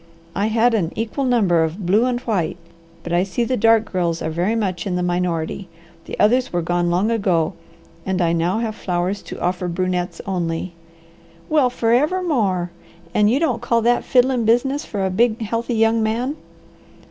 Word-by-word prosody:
I 200 +3 +1
had 230 +2 +3
an 180 -7 0
equal 230 +5 -2
number 200 -10 +3
of 170 +4 -4
blue 205 +7 +3
and 245 -1 -1
white, 190 -10 -1 0.5
but 170 - -4
I 175 - +3
see 195 +5 -1
the 255 +2 0
dark 225 -1 +3
girls 170 -3 0
are 160 - -2
very 180 +7 0
much 190 -5 -2
in 180 - -1
the 180 - -1
minority. 175 0 -2 0.4
The - - -7
others 250 +5 +3
were 175 -1 -1
gone 175 +1 0
long 185 +6 +1
ago, 190 -6 +1 0.5
and 190 +1 -1
I 170 -2 +2
now 170 +4 0
have 225 -1 -2
flowers 185 0 -2
to - - -9
offer 180 0 -1
brunettes 180 +1 -2
only." 175 -2 -2 0.8
"Well 295 -5 +3
forever 255 +10 +1
more! 195 - 0 0.4
And 210 0 +4
you 255 +5 +2
don't 255 -8 0
call 235 -2 +1
that 240 +1 +2
fiddlin' 250 -1 +2
business 265 +6 +2
for 200 -3 -2
a 190 - -1
big, 230 +4 +2
healthy, 230 +2 -2
young 225 0 +3
man?" 235 +6 -1
205 Hz, 180 wpm, -20 LUFS, 175-235 Hz, 0.8 s, And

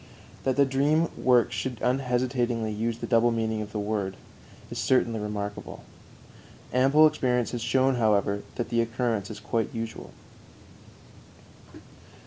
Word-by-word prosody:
That 130 -1 +2
the 140 +1 +5
dream 145 +5 +2
work 125 -2 +3
should 125 -4 -4
unhesitatingly 125 -3 0
use 115 +2 -2
the - - -5
double 120 0 +3
meaning 110 -1 -1
of 105 0 -7
the 105 - -4
word 100 -2 -2 0.5
is - - -4
certainly 115 -3 +2
remarkable; 105 -1 -5 0.9
ample 135 +5 +5
experience 125 -6 +1
has 120 - -4
shown, 130 +2 +2
however, 100 -3 +2
that 120 - -3
the 115 0 +2
occurrence 115 -3 -1
is 110 - -7
quite 110 +1 -1
usual. 115 0 -5
115 Hz, 130 wpm, -27 LUFS, 110-130 Hz, 0.9 s, the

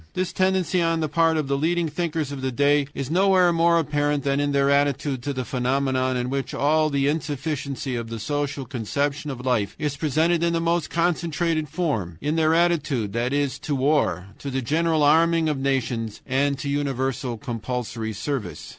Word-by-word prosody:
This 185 -1 -1
tendency 185 -1 +1
on 165 -1 +1
the 155 - 0
part 165 +2 +2
of 150 -3 -1
the 140 - +1
leading 165 +4 +1
thinkers 160 -2 -2
of 140 -2 -5
the 130 0 -1
day 145 +2 +2
is 140 +1 -4
nowhere 185 -1 +4
more 170 0 +4
apparent 145 -2 0
than 140 0 +1
in 145 0 0
their 140 0 +2
attitude 140 -2 +1
to 140 - -3
the 130 -2 -3
phenomenon 130 +1 0
in 125 +1 -2
which 135 -1 -3
all 155 +2 +2
the 140 -1 +1
insufficiency 145 -2 -2
of 115 -1 -4
the 115 - -5
social 145 +2 -2
conception 140 +4 -2
of 130 -2 -6
life 115 -6 0
is 150 -2 -2
presented 160 +3 +1
in 170 0 +1
the 165 - +1
most 170 -1 0
concentrated 165 -2 0
form 135 - -2
in 150 +2 -1
their 160 0 +3
attitude, 150 - +1
that 120 +2 -1
is, 145 -1 0
to 145 - -2
war, 135 -9 +1
to 140 - -5
the 135 -1 -2
general 160 +3 +1
arming 165 +2 +4
of 150 -3 -1
nations, 120 -5 -1
and 140 +2 +1
to 140 - -5
universal 135 -4 -1
compulsory 115 0 -4
service. 110 - -4
145 Hz, 190 wpm, -24 LUFS, 130-160 Hz, -, nowhere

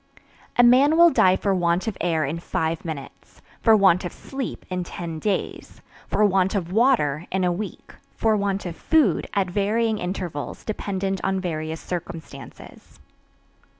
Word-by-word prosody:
A 245 - +7
man 270 +6 +5
will 340 0 +7
die 185 -8 +4
for 195 +1 0
want 175 -1 +1
of 220 -4 -3
air 165 -3 +1
in 155 +5 -3
five 160 -1 -2
minutes; 155 -5 -9 0.2
for 225 -2 +6
want 190 -3 +4
of 175 - -4
sleep, 270 -2 -6
in 180 -1 -3
ten 165 -2 -6
days; 205 +3 -3 0.3
for 210 - +2
want 190 0 +2
of 180 -3 -2
water, 195 - +2
in 190 0 0
a 180 - +2
week; 200 +4 -6 0.2
for 220 -1 +2
want 200 -1 -1
of 170 -2 -5
food, 290 - +2
at 195 -2 +2
varying 215 +3 0
intervals, 180 -5 -5
dependent 195 -3 -3
on 190 0 0
various 160 -3 -4
circumstances. 165 -6 -9
190 Hz, 155 wpm, -23 LUFS, 170-210 Hz, 0.3 s, A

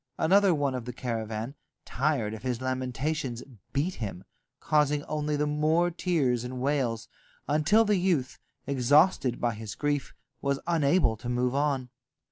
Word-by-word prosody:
Another 195 +4 +4
one 145 -4 +1
of 125 -2 -4
the 125 - -5
caravan, 115 0 -4 0.3
tired 130 -7 0
of 110 - -7
his 125 -1 -2
lamentations, 130 0 -2 0.3
beat 150 +7 0
him, 95 -4 -5 0.4
causing 150 -1 +2
only 150 0 -2
the 150 +1 +1
more 155 +4 +2
tears 145 -9 0
and 125 +1 -5
wails, 125 -5 -1 0.4
until 155 +10 +4
the 210 -1 +2
youth, 170 -8 0 0.3
exhausted 140 0 +3
by 120 -1 0
his 110 -2 -7
grief, 145 -1 -2 0.3
was 140 -1 0
unable 160 -6 +2
to 120 - -6
move 125 +1 0
on. 140 -3 0
140 Hz, 145 wpm, -28 LUFS, 125-155 Hz, 0.4 s, Another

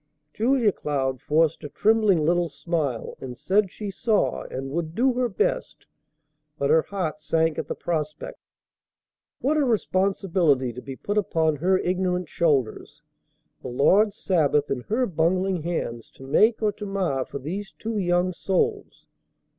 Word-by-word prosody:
Julia 235 -1 +2
Cloud 135 -6 -2
forced 160 +1 +1
a 150 - -6
trembling 210 -6 +3
little 175 +1 +2
smile, 145 -5 -3
and 125 -2 -7
said 200 +1 +2
she 205 +2 -6
saw, 215 +2 0
and 135 +1 -6
would 165 +1 -3
do 255 +2 +3
her 250 0 0
best; 190 - -2 0.7
but 140 0 +1
her 160 0 +6
heart 170 -4 -4
sank 160 0 0
at - - -4
the - - -3
prospect. 155 -3 -4 1.0
What 295 +4 +1
a 300 - +3
responsibility 185 - +1
to 125 - -8
be 135 0 -7
put 205 +9 -1
upon 160 -6 +1
her 185 +6 +2
ignorant 180 -2 -1
shoulders. 145 -1 -1 0.6
The - - -7
Lord's 195 - +3
Sabbath 150 -5 +1
in 130 -2 -1
her 245 +4 +2
bungling 185 0 0
hands 150 -9 -4
to 135 - -12
make 215 - +3
or 210 - +3
to 205 +1 -8
mar 185 -9 -1
for 140 - -7
these 185 +9 -5
two 220 -1 -3
young 175 0 +1
souls! 415 - -2
175 Hz, 155 wpm, -25 LUFS, 150-200 Hz, 1.0 s, her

